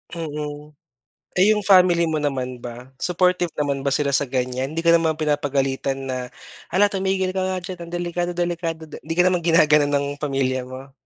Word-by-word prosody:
Mm. 150 Hz, -2 st, -6 dB, 0.6 s
Eh, 190 Hz, +4 st, +5 dB
yung 210 Hz, -, -2 dB
family 180 Hz, -3 st, +5 dB
mo 155 Hz, -, 0 dB
naman 130 Hz, -4 st, -3 dB
ba, 120 Hz, +2 st, -9 dB
supportive 180 Hz, -1 st, +1 dB
naman 140 Hz, -2 st, -1 dB
ba 140 Hz, -, +2 dB
sila 140 Hz, 0 st, +1 dB
sa 140 Hz, 0 st, +1 dB
ganyan? 130 Hz, +2 st, -2 dB
Hindi 165 Hz, -, -2 dB
ka 170 Hz, -, +5 dB
naman 165 Hz, -2 st, +3 dB
pinapagalitan 135 Hz, -3 st, -1 dB
na, 130 Hz, -1 st, -3 dB, 0.4 s
"Hala 200 Hz, +4 st, +4 dB
tumigil 190 Hz, -1 st, 0 dB
ka 190 Hz, -, -3 dB
nga 185 Hz, 0 st, -1 dB
diyan 180 Hz, -1 st, -7 dB
ang 170 Hz, -, -11 dB
delikado 175 Hz, 0 st, -2 dB
delikado." 170 Hz, -2 st, -2 dB, 0.2 s
Di 165 Hz, +2 st, -5 dB
ka 180 Hz, -, +4 dB
naman 180 Hz, -1 st, +2 dB
ginaganon 150 Hz, -3 st, +4 dB
ng 140 Hz, 0 st, +1 dB
pamilya 135 Hz, -3 st, -1 dB
mo? 130 Hz, +1 st, -10 dB
150 Hz, 180 wpm, -22 LUFS, 135-175 Hz, 0.6 s, Eh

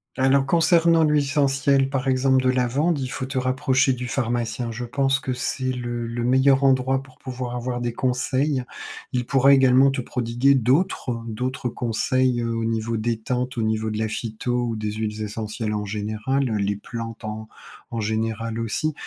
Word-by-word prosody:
Alors 135 Hz, +1 st, +3 dB
concernant 165 Hz, +1 st, +4 dB
l'huile 150 Hz, -1 st, +3 dB
essentielle 140 Hz, -1 st, +2 dB
par 135 Hz, -1 st, -2 dB
exemple 130 Hz, 0 st, +3 dB
de 130 Hz, -, +3 dB
lavande, 135 Hz, +6 st, +1 dB
il 130 Hz, -, -2 dB
faut 130 Hz, -, -4 dB
te 130 Hz, 0 st, -2 dB
rapprocher 130 Hz, +1 st, +2 dB
du 125 Hz, 0 st, -5 dB
pharmacien. 120 Hz, -1 st, -2 dB
Je 120 Hz, +2 st, -5 dB
pense 135 Hz, +2 st, +1 dB
que 130 Hz, -2 st, -3 dB
c'est 130 Hz, +1 st, -2 dB
le 120 Hz, -1 st, -4 dB
le 115 Hz, +1 st, -3 dB
meilleur 130 Hz, +2 st, +4 dB
endroit 130 Hz, 0 st, +3 dB
pour 130 Hz, -2 st, -18 dB
pouvoir 125 Hz, -1 st, -5 dB
avoir 120 Hz, 0 st, -3 dB
des 120 Hz, -1 st, -2 dB
conseils. 130 Hz, +2 st, 0 dB, 0.5 s
Il 125 Hz, -1 st, -1 dB
pourra 135 Hz, +2 st, +5 dB
également 130 Hz, 0 st, +5 dB
te 135 Hz, -1 st, -2 dB
prodiguer 120 Hz, +2 st, +1 dB
d'autres 125 Hz, -2 st, +1 dB
d'autres 125 Hz, +3 st, -3 dB
conseils, 120 Hz, +2 st, 0 dB
heu, 115 Hz, 0 st, -2 dB
au 115 Hz, -, -2 dB
niveau 115 Hz, 0 st, -1 dB
détente. 120 Hz, +3 st, -2 dB
Au 115 Hz, -, 0 dB
niveau 110 Hz, 0 st, 0 dB
de 105 Hz, -, -3 dB
la 110 Hz, 0 st, 0 dB
phyto 110 Hz, +2 st, -3 dB
ou 115 Hz, -, -2 dB
des 105 Hz, -1 st, -3 dB
huiles 110 Hz, 0 st, -3 dB
essentielles 105 Hz, +1 st, -4 dB
en 105 Hz, 0 st, -2 dB
général, 110 Hz, +6 st, -1 dB
heu, 110 Hz, -3 st, -1 dB
les 100 Hz, 0 st, 0 dB
plantes 115 Hz, +2 st, -7 dB
en 110 Hz, 0 st, -6 dB, 0.4 s
en 115 Hz, -2 st, -4 dB
général 110 Hz, +1 st, -2 dB
aussi 115 Hz, +8 st, -1 dB
125 Hz, 180 wpm, -23 LUFS, 115-135 Hz, 0.5 s, pourra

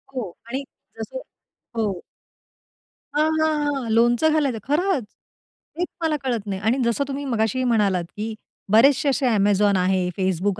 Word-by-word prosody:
हो. 220 Hz, -9 st, -3 dB, 0.2 s
आणि 265 Hz, +4 st, -3 dB, 0.4 s
जसं -, -, -5 dB, 0.6 s
हो. 205 Hz, -5 st, -1 dB, 1.1 s
हां, 305 Hz, +1 st, +3 dB
हां, 300 Hz, -2 st, +1 dB
हां. 255 Hz, -4 st, -3 dB
लोणचं 240 Hz, +7 st, +4 dB
घालायचं 280 Hz, -7 st, +1 dB
खरंच. 295 Hz, -, 0 dB, 0.7 s
तेच 355 Hz, +1 st, 0 dB
मला 320 Hz, -2 st, +1 dB
कळत 235 Hz, -5 st, -1 dB
नाही 195 Hz, 0 st, -3 dB
आणि 225 Hz, +5 st, +2 dB
जसं 235 Hz, +4 st, +1 dB
तुम्ही 280 Hz, +1 st, -4 dB
मगाशी 240 Hz, 0 st, 0 dB
म्हणालात, 205 Hz, -7 st, +2 dB
की 215 Hz, +1 st, -4 dB, 0.4 s
बरेचसे 275 Hz, +6 st, +5 dB
असे 275 Hz, 0 st, 0 dB
Amazon 200 Hz, 0 st, +3 dB
आहे, 185 Hz, 0 st, +1 dB
Facebook 190 Hz, +1 st, 0 dB
235 Hz, 140 wpm, -23 LUFS, 205-285 Hz, 1.1 s, बरेचसे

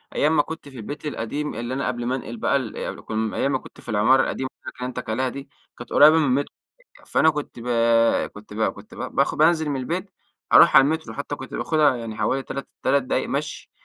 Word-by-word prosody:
أيام 155 Hz, +2 st, +2 dB
ما -, -, +5 dB
كنت 160 Hz, -2 st, -8 dB
في 135 Hz, -, -13 dB
البيت 145 Hz, +7 st, -7 dB
القديم 150 Hz, +2 st, -3 dB
اللي 120 Hz, +2 st, -4 dB
أنا 135 Hz, -, -2 dB
قبل 120 Hz, -1 st, -3 dB
ما 125 Hz, -, 0 dB
أنقل 120 Hz, -3 st, -6 dB
بقى 140 Hz, -, +1 dB
ال 130 Hz, -6 st, -3 dB
كم 110 Hz, 0 st, -2 dB
أيام 140 Hz, -, 0 dB
ما 130 Hz, -, +2 dB
كنت -, -, -14 dB
في -, -, -12 dB
العمارة 115 Hz, +5 st, +4 dB
القديمة 130 Hz, 0 st, -3 dB
اللي -, -, -53 dB
أنا -, -, -6 dB
كلمتك 125 Hz, -3 st, -5 dB
عليها 130 Hz, +3 st, 0 dB
دي، 140 Hz, +1 st, -9 dB, 0.3 s
كانت -, -, -10 dB
قريبة 155 Hz, +2 st, +7 dB
مِن 160 Hz, -, +3 dB
المتر 140 Hz, +1 st, 0 dB, 0.5 s
فأنا 160 Hz, -, +3 dB
كنت 150 Hz, -5 st, -5 dB
بَ 120 Hz, -, -8 dB, 0.7 s
كنت 105 Hz, 0 st, -12 dB
ب 110 Hz, -, -4 dB
كنت -, -, -14 dB
ب -, -, -14 dB, 0.2 s
باخ -, -, +2 dB
بانزل 160 Hz, -1 st, +3 dB
مِن 140 Hz, -, -1 dB
البيت، 180 Hz, +9 st, -3 dB, 0.4 s
أروح 170 Hz, -, +8 dB
على 135 Hz, -, +9 dB
المترو 160 Hz, +3 st, -1 dB
حتى 145 Hz, 0 st, -4 dB
كنت 130 Hz, -, -10 dB
باخدها 150 Hz, -5 st, +2 dB
يعني 115 Hz, -2 st, -6 dB
حوالي 135 Hz, +4 st, 0 dB
3 140 Hz, -1 st, -6 dB, 0.2 s
3 140 Hz, +1 st, +3 dB
دقايق 130 Hz, -, -1 dB
مَشي، -, -, -4 dB
135 Hz, 225 wpm, -23 LUFS, 120-150 Hz, 0.7 s, على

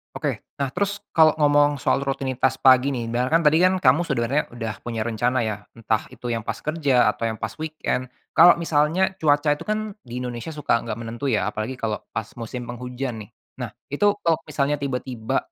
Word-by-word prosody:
Oke, -, -, -2 dB, 0.2 s
nah 140 Hz, -1 st, -2 dB
terus 200 Hz, +4 st, -2 dB
kalau 160 Hz, -1 st, +5 dB
ngomong 145 Hz, -1 st, +4 dB
soal -, -, +2 dB
rutinitas 135 Hz, -1 st, 0 dB
pagi 130 Hz, +1 st, +6 dB
nih, 115 Hz, -2 st, -4 dB
dar 125 Hz, +2 st, 0 dB
kan 165 Hz, +4 st, +3 dB
tadi 155 Hz, +1 st, +5 dB
kan 185 Hz, +1 st, +4 dB
kamu 145 Hz, -3 st, +4 dB
sebenarnya 135 Hz, +1 st, +1 dB
udah 115 Hz, -2 st, -3 dB
punya 115 Hz, -2 st, -3 dB
rencana 120 Hz, +2 st, 0 dB
ya, 110 Hz, -2 st, -1 dB, 0.2 s
entah 110 Hz, -2 st, -1 dB
itu 120 Hz, -, -6 dB
yang 115 Hz, -1 st, -1 dB
pas -, -, -2 dB
kerja 140 Hz, -8 st, +3 dB
atau 115 Hz, -, -3 dB
yang 110 Hz, -, -2 dB
pas 110 Hz, +1 st, -4 dB
weekend. 155 Hz, -5 st, -2 dB, 0.2 s
Kalau 175 Hz, +2 st, +8 dB
misalnya 165 Hz, +3 st, +1 dB
cuaca 145 Hz, -1 st, +3 dB
itu 165 Hz, -, -8 dB
kan 215 Hz, 0 st, -1 dB
di 120 Hz, -, -12 dB
Indonesia 120 Hz, +3 st, -5 dB
suka 150 Hz, -5 st, +1 dB
enggak 115 Hz, -2 st, -5 dB
menentu 115 Hz, +4 st, -4 dB
ya, 105 Hz, -7 st, +1 dB
apalagi 110 Hz, +5 st, -4 dB
kalau 110 Hz, -4 st, -2 dB, 0.2 s
pas 110 Hz, -2 st, -2 dB
musim 120 Hz, +2 st, -5 dB
penghujan 125 Hz, -1 st, -5 dB
nih. -, -, -31 dB, 0.3 s
Nah -, -, -3 dB, 0.2 s
itu 145 Hz, +8 st, +1 dB, 0.2 s
tok 165 Hz, -1 st, +2 dB
misalnya 145 Hz, 0 st, +1 dB
tiba-tiba, 125 Hz, -4 st, -2 dB
130 Hz, 195 wpm, -23 LUFS, 115-150 Hz, 0.3 s, Kalau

